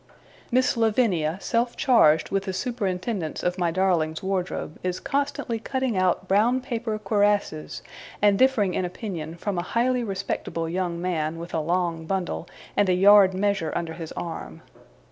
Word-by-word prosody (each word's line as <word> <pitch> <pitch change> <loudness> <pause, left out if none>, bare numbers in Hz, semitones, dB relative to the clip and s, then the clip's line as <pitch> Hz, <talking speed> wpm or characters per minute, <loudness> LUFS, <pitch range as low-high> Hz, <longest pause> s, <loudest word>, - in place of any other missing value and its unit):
Miss 255 +2 +3
Lavinia, 210 -8 +1
self 235 +3 -1
charged 160 - +4
with 195 0 0
the 190 - -3
superintendence 190 - -3
of 180 +1 -1
my 175 -1 +2
darling's 165 -3 0
wardrobe, 185 -4 -3
is 180 0 -2
constantly 280 -4 -2
cutting 260 -1 -2
out 185 0 +1
brown 220 +7 +3
paper 230 -3 -3
cuirasses, 205 - 0 0.4
and 205 -1 +4
differing 230 -8 +3
in - - -1
opinion 175 -3 -5
from 185 +1 -3
a 175 - -6
highly 250 +1 +2
respectable 190 -5 -3
young 175 0 -2
man, 165 -3 -2
with 170 +1 -8
a 160 - +1
long 170 0 -1
bundle, 185 -2 -3 0.3
and 205 -2 +3
a 180 - +4
yard 195 0 +6
measure 195 -4 0
under 165 -1 -2
his 165 -1 -7
arm. 170 -1 -6
190 Hz, 155 wpm, -25 LUFS, 170-220 Hz, 0.4 s, yard